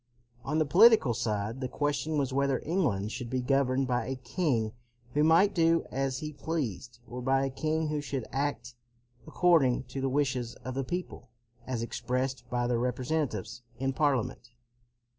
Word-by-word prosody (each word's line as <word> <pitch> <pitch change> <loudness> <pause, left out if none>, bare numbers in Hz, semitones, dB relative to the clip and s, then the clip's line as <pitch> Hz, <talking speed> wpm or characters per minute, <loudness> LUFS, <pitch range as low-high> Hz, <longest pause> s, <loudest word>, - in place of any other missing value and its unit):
On 150 +4 -1
the 155 - +3
political 195 - +6
side 110 +1 -2
the 130 - -1
question 145 +3 -1
was 135 -3 0
whether 140 -1 +2
England 130 - 0
should 120 +1 -5
be 130 - -1
governed 135 +1 +2
by 125 -1 0
a 135 - -2
king 125 - -1 0.4
who 150 - +3
might 165 +6 +5
do 165 -1 +3
as 135 -1 -1
he 150 +2 -5
pleased, 125 - -4
or 125 +2 -6
by 135 +1 +2
a 135 - -2
king 155 +2 -1
who 150 -1 -1
should 135 -4 -4
act 135 -3 -2 0.5
according 155 -7 +3
to 130 +1 -6
the 135 - 0
wishes 130 -4 -1
of 130 - -3
the 135 +1 -2
people 175 +7 -5 0.4
as 125 -3 -2
expressed 125 +3 -3
by 120 0 0
their 120 -1 +1
representatives 125 -3 -2 0.2
in 135 0 -1
Parliament. 130 -4 0
135 Hz, 165 wpm, -29 LUFS, 125-150 Hz, 0.5 s, political